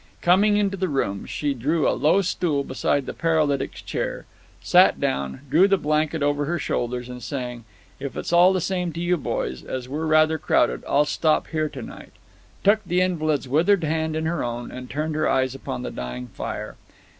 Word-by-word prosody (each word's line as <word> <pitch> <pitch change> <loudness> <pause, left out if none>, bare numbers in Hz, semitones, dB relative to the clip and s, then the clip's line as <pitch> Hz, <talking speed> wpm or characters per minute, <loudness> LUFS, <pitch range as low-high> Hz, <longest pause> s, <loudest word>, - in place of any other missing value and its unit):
Coming 205 +4 +4
into 200 -1 +1
the 185 -1 -1
room, 100 -9 -2
she 145 -2 -1
drew 145 +6 0
a - - +4
low 175 +6 +3
stool 160 -5 0
beside 135 +1 -1
the - - -5
paralytic's 155 -4 0
chair, - - -3 0.3
sat - - +5
down, 65 - -2
drew 165 +8 +5
the 195 0 +3
blanket 155 -1 0
over 145 0 +1
her 175 +4 -1
shoulders, 125 -4 -2
and 125 0 -8
saying, 125 -1 -5 0.3
"If 140 - -6
it's - - -3
all 175 +2 +7
the 185 -1 0
same 180 -1 -1
to 165 - -6
you, 175 +1 +1
boys, 65 - -3
as 130 -1 -5
we're 155 +4 -3
rather 155 0 +4
crowded, 60 - +2
I'll 145 +1 +4
stop 155 +1 +1
here 155 -1 -1
tonight," 130 -6 -10 0.5
took 215 +2 +4
the 180 -1 0
invalid's 155 -6 0
withered 170 +7 +3
hand 160 0 -1
in 160 0 -2
her 165 -1 -1
own, 120 0 -4
and 125 0 -8
turned 155 +3 -2
her 155 +1 +1
eyes 130 -1 +1
upon 65 - -5
the - - -4
dying 60 0 -6
fire. - - -6
155 Hz, 190 wpm, -23 LUFS, 130-170 Hz, 0.5 s, all